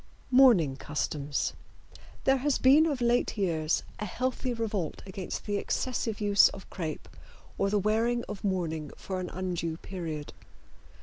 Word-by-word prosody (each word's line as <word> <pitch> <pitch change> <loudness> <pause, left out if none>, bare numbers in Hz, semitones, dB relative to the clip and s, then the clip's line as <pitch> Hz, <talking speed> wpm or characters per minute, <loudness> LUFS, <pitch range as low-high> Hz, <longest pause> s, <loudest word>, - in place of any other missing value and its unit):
MOURNING 225 - +6
CUSTOMS. 145 -1 -2 0.7
There 270 0 +4
has 275 +1 +1
been 290 +5 +6
of 280 -5 -2
late 240 -1 +2
years 165 -5 +1 0.2
a 210 - -2
healthy 255 +5 -2
revolt 215 -8 -3
against 190 -1 -5
the 205 -1 -1
excessive 230 0 -2
use 205 -2 +6
of 190 - -10
crepe 160 -5 -5 0.5
or 195 - +2
the 205 - +2
wearing 225 +4 +1
of 210 -2 -7
mourning 165 -6 -1
for 190 -1 -4
an 180 - -4
undue 175 -3 -3
period. 165 -6 -6
195 Hz, 140 wpm, -29 LUFS, 170-235 Hz, 0.7 s, MOURNING